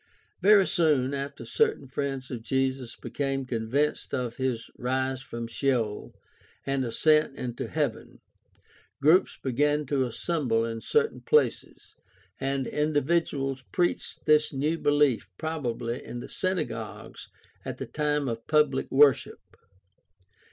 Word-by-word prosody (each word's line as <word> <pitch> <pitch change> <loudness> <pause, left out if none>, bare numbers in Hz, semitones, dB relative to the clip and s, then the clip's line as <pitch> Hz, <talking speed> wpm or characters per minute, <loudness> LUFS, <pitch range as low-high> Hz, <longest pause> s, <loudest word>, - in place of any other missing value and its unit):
— - - -41
Very 200 0 +6
soon 150 -8 +2
after 140 -3 -5
certain 135 +4 +1
friends 135 -1 -4
of 120 -3 -4
Jesus 130 0 -1
became 135 -1 -3
convinced 125 +7 -1
of 125 -3 -3
his 130 -3 -2
rise 130 +1 -1
from 115 -2 -6
Sheol 115 -3 -1 0.5
and 135 -1 0
ascent 150 +4 +3
into 120 -1 -4
heaven, - - -3 0.8
groups 155 +6 +4
began 145 +3 +1
to 130 -2 0
assemble 120 -4 0
in 115 -1 -4
certain 450 0 +1
places, 460 0 0 0.5
and 135 -1 -1
individuals 145 -2 0
preached 175 -2 -1
this 150 0 +4
new 150 +4 -1
belief 145 -8 +2
prob 160 -4 -3
ably 115 +2 -3
in 120 - -7
the - - -8
synagogues 150 - -4 0.3
at - - -5
the - - -5
time 150 -2 -1
of 115 -1 -4
pubHc 150 -3 +2
worship. 140 -2 +4
135 Hz, 125 wpm, -27 LUFS, 125-150 Hz, 0.8 s, Very